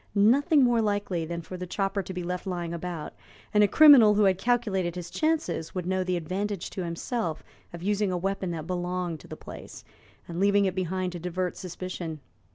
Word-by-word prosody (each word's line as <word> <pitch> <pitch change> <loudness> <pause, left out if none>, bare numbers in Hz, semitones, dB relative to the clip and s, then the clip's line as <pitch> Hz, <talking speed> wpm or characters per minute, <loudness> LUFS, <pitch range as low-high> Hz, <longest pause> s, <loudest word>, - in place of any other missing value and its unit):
Nothing 270 +8 +5
more 240 -2 +3
likely 205 -5 -1
than 170 0 -4
for 185 - -7
the 180 0 -6
chopper 195 +1 -1
to 190 - -8
be 180 -1 -4
left 180 +2 -4
lying 175 -2 -3
about, 170 -2 -5 0.4
and 210 0 +5
a - - +5
criminal 250 -5 +8
who 210 - +4
had 190 -2 +3
calculated 195 -7 0
his 175 -1 -6
chances 315 - -1
would 180 -2 -3
know 185 +1 0
the 180 -1 -1
advantage 190 +3 -3
to 185 - -4
himself 170 0 -3 0.3
of 170 0 -9
using 205 0 +1
a 180 - 0
weapon 195 +1 -2
that 160 -3 -4
belonged 180 -1 -3
to - - -15
the - - -8
place, - - -10 0.4
and 170 0 -5
leaving 200 +1 +4
it 190 - 0
behind 185 0 -2
to 175 - -6
divert 180 +1 -2
suspicion. 175 -3 -6
185 Hz, 200 wpm, -27 LUFS, 175-205 Hz, 0.4 s, criminal